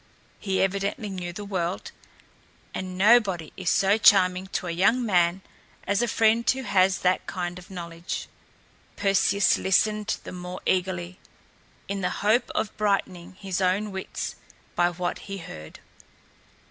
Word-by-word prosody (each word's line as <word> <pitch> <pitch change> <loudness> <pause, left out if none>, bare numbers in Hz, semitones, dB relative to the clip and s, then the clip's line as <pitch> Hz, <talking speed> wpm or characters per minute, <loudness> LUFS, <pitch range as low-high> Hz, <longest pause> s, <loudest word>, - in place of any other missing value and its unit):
He 195 -2 0
evidently 200 +2 -2
knew 180 -2 -5
the 205 +4 -7
world; 185 -2 -3 0.8
and 185 -1 -5
nobody 195 -6 +3
is 185 -3 -2
so 195 +5 +3
charming 185 -2 +5
to 190 - -3
a 175 - -2
young 215 +9 +2
man 180 -2 +2 0.4
as 200 +2 +1
a 240 - +1
friend 225 +1 +2
who 265 0 +1
has 190 -3 +2
that 180 0 +1
kind 175 -1 -4
of 180 - -15
knowledge. 170 -2 -6 0.7
Perseus 195 -1 +3
listened 210 +3 +1
the - - -8
more 180 0 -7
eagerly, 180 -1 -1 0.7
in 200 0 -3
the 180 - 0 0.2
hope 225 +7 +3
of 220 -9 -2
brightening 195 -4 -1
his 190 -1 -4
own 195 +3 +1
wits 190 0 -5 0.4
by 175 0 +3
what 175 0 -3
he 195 - -4
heard. 80 - -10
190 Hz, 145 wpm, -26 LUFS, 180-205 Hz, 0.8 s, charming